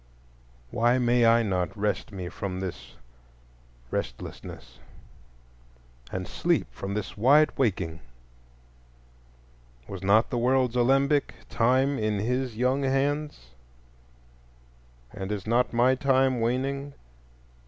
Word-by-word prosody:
Why 120 +2 +2
may 120 -1 +3
I 115 +1 +5
not 90 -3 -2
rest 105 +1 -2
me 95 -3 -6
from 95 +1 -5
this 75 -11 -7 1.0
restlessness - - -6 1.3
and 95 0 -4
sleep 170 -2 0
from 100 +1 -5
this 105 - -4
wide 140 +8 +5
waking? 90 - -1 1.9
Was 95 -2 -7
not 105 +4 +3
the 120 - 0
world's 125 0 +2
alembic, 135 +4 +2
Time, 130 +4 +2
in 105 -1 0
his 125 +2 -2
young 130 +3 +1
hands, 140 - -1 1.6
and 95 +1 -5
is 100 -2 -4
not 120 +3 +1
my 120 +2 +3
time 130 -1 +2
waning? 135 +4 -2
120 Hz, 105 wpm, -27 LUFS, 100-135 Hz, 1.9 s, I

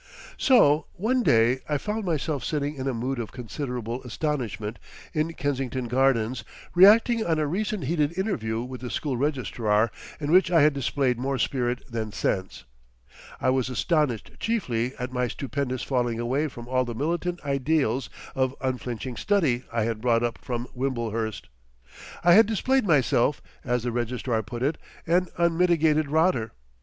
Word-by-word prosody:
So 155 - +5
one 240 +7 +1
day 120 - +4
I 150 - +2
found 210 +8 -3
myself 155 -5 -1
sitting 145 -2 -1
in 135 -2 -5
a 135 - 0
mood 125 +3 -2
of 115 - -5
considerable 125 -1 -5
astonishment 120 -5 -3 0.3
in 155 +2 0
Kensington 135 -4 -2
Gardens, 125 -2 +1 0.3
reacting 220 +5 +6
on 165 -4 +1
a 155 - +1
recent 195 +4 -2
heated 150 +3 0
interview 115 - -1
with 125 -1 -8
the 125 - -5
school 140 0 -2
Registrar 120 -5 0 0.3
in 145 0 -2
which 185 0 +5
I 165 -4 +5
had 150 0 +5
displayed 135 -2 0
more 135 +1 -1
spirit 125 0 -1
than 115 -4 -4
sense. 95 -1 -2 0.8
I 130 - +2
was 130 -1 0
astonished 145 - 0
chiefly 130 - -1
at 125 0 -5
my 125 -1 0
stupendous 130 0 -3
falling 120 -3 0
away 130 +6 0
from 120 -4 -10
all 130 0 +1
the 120 -2 -5
militant 175 +6 -1
ideals 140 -3 0 0.2
of 130 0 0
unflinching 125 -2 -3
study 155 -12 +1
I 115 -1 0
had 110 -1 -2
brought 120 -1 +2
up 120 -1 -2
from 120 -1 -4
Wimblehurst. 115 -4 -2 0.8
I 175 0 +7
had 220 +3 +7
displayed 255 +2 +1
myself, 135 -3 +3 0.2
as 125 -2 0
the 120 - -1
Registrar 120 -1 -1
put 120 +3 -6
it, 150 +3 0 0.3
"an 180 +2 +2
unmitigated 165 -3 +3
rotter." 155 -7 +2
130 Hz, 155 wpm, -26 LUFS, 120-155 Hz, 0.8 s, I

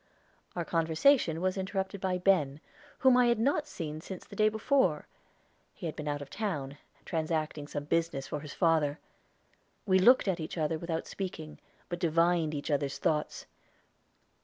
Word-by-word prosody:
Our 175 -2 -2
conversation 165 - +3
was 185 +1 0
interrupted 190 0 -3
by 185 -1 0
Ben, 175 -7 +2 0.5
whom 260 -1 +8
I 250 -1 +5
had 235 -1 +3
not 285 +6 +1
seen 155 - -6
since 185 +1 -8
the - - -12
day 215 0 +4
before. 220 - +1 0.7
He - - -8
had 160 - -3
been 150 - -6
out 145 -1 -2
of 140 - -14
town, 150 -10 -3 0.3
transacting 155 -2 -2
some 145 - -4
business 160 -2 -1
for 150 - -4
his 145 -1 -9
father. 160 -4 +2 0.9
We 190 -2 +4
looked 240 +4 +6
at 185 -3 0
each 160 +2 -5
other 155 0 0
without 165 -1 -3
speaking, 165 -5 -6 0.3
but 175 -1 -4
divined 165 -1 +2
each 145 +2 -3
other's 140 -1 0
thoughts. 150 -1 -1
165 Hz, 160 wpm, -30 LUFS, 150-190 Hz, 0.9 s, whom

